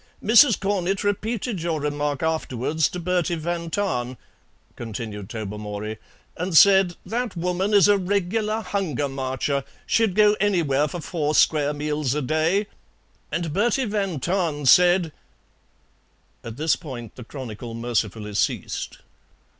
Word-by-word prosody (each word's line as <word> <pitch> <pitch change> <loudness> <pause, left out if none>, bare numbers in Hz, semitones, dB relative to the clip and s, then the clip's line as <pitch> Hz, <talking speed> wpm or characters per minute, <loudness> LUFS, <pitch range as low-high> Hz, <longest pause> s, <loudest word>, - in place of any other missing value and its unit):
"Mrs. 235 +2 +6
Cornett 195 -1 -1
repeated 210 0 -2
your 165 -2 -1
remark 145 -1 -2
afterwards 160 -1 0
to 180 - -6
Bertie 175 0 0
van 170 +1 -3
Tahn," 130 - -2 0.6
continued 110 -3 -6
Tobermory, 105 0 -5 0.4
"and 180 -1 0
said, 190 -2 +6
'That 230 -1 -3
woman 180 +4 -1
is 200 -1 +6
a 205 -1 +4
regular 205 +3 -1
Hunger 170 - -2
Marcher; 135 +1 -2 0.2
she'd 220 -5 +1
go 210 0 +5
anywhere 155 -8 +2
for 175 +3 -6
four 155 -3 -2
square 150 -2 +3
meals 150 -2 -2
a 150 - 0
day,' 160 +9 +1 0.7
and 165 -3 -2
Bertie 240 - +1
van 200 -7 -2
Tahn 165 -3 -1
said 175 +3 +5 0.7
" - - -40
At 115 0 -8
this 155 +2 +2
point 120 - -8
the 125 - -10
chronicle 115 -2 -8
mercifully 110 -3 -2
ceased. 100 - -2
160 Hz, 130 wpm, -23 LUFS, 130-195 Hz, 0.7 s, Mrs